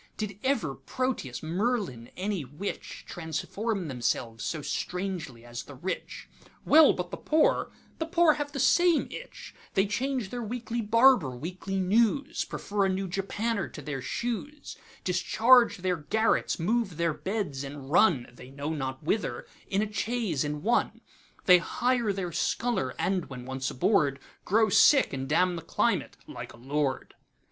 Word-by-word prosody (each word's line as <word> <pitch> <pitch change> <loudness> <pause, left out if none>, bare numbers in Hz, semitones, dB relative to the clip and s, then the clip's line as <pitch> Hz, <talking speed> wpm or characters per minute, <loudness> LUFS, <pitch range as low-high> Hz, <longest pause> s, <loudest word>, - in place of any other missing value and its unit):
Did 205 -2 -4
ever 235 - +1
Proteus, 160 - -3
Merlin, 175 - -1
any 190 -3 -2
witch, 145 +10 -6
Transform 180 +4 -3
themselves 120 -3 -2
so 155 -3 -3
strangely 180 -12 -4
as 120 0 -6
the 145 - -11
Rich? 180 +8 -5 0.4
Well, 310 0 +7
but 180 0 -5
the - - -4
Poor—the 315 +1 0
Poor 340 -2 +5
have 290 -1 -4
the 275 - -5
same 345 +5 +4
itch; - - -9 0.2
They 195 - +4
change 245 +1 -2
their 245 - -4
weekly 235 +1 -3
barber, 230 - +5
weekly 185 +6 -4
news, 230 - +2
Prefer 205 -1 -1
a - - +2
new 190 +1 -1
japanner 200 +3 -2
to - - -10
their 135 -2 -4
shoes, 245 - -4 0.3
Discharge 245 +1 +4
their 180 -1 -1
garrets, 220 +9 +1
move 195 0 0
their 170 -1 +1
beds, 155 -3 -3
and 140 -1 -8
run(They 130 - +2
know 140 +3 -4
not 135 -1 -4
whither) 205 +8 -1 0.2
in 200 +2 +1
a 215 0 -6
chaise 210 - -1
and 150 0 -4
one; 235 +4 +1 0.4
They 180 -1 +8
hire 240 +4 0
their 190 -3 -3
sculler, 160 - -1
and 185 -3 0
when 125 -2 -8
once 130 0 -3
aboardGrow 195 - +1
sick, 280 - +6
and 135 0 -4
damn 180 +3 +3
the 165 - -5
climate—like - - -2
a - - -14
Lord. 135 +2 -2
190 Hz, 145 wpm, -28 LUFS, 150-230 Hz, 0.4 s, They